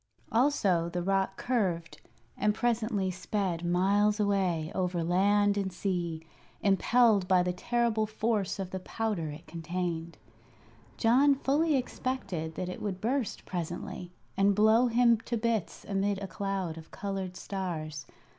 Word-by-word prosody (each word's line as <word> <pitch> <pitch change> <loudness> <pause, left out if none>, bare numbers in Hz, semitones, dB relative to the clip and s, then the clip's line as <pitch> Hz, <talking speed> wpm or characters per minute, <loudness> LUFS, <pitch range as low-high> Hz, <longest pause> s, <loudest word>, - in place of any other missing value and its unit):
Also 205 - +2
the 175 0 -3
rocket 195 0 0
curved, 185 -10 -1 0.3
and 210 0 +1
presently 220 -4 0
sped 185 -2 -2
miles 200 +4 +2
away 185 -6 +1
over 180 -2 -1
land 205 +4 +3
and 190 -1 -2
sea, 175 -3 -3 0.4
impelled 205 0 +4
by 185 -1 +4
the 180 0 -1
terrible 230 +2 0
force 215 -2 -1
of 190 -2 -5
the 190 - -3
powder 205 -5 -2
it 150 +3 -9
contained. 170 -1 -4 0.8
John 270 +5 +5
fully 290 +3 +2
expected 245 -11 -3
that 185 - -3
it 180 - -6
would 195 -3 -3
burst 245 +1 -2
presently, 175 0 -5 0.2
and 195 +1 +3
blow 220 +4 +5
him 235 0 +4
to 235 +1 -3
bits 225 -4 -2
amid 200 0 0
a 200 - -5
cloud 190 -3 -3
of 160 - -14
colored 195 -2 -4
stars. 160 -6 -4
195 Hz, 135 wpm, -30 LUFS, 175-220 Hz, 0.8 s, John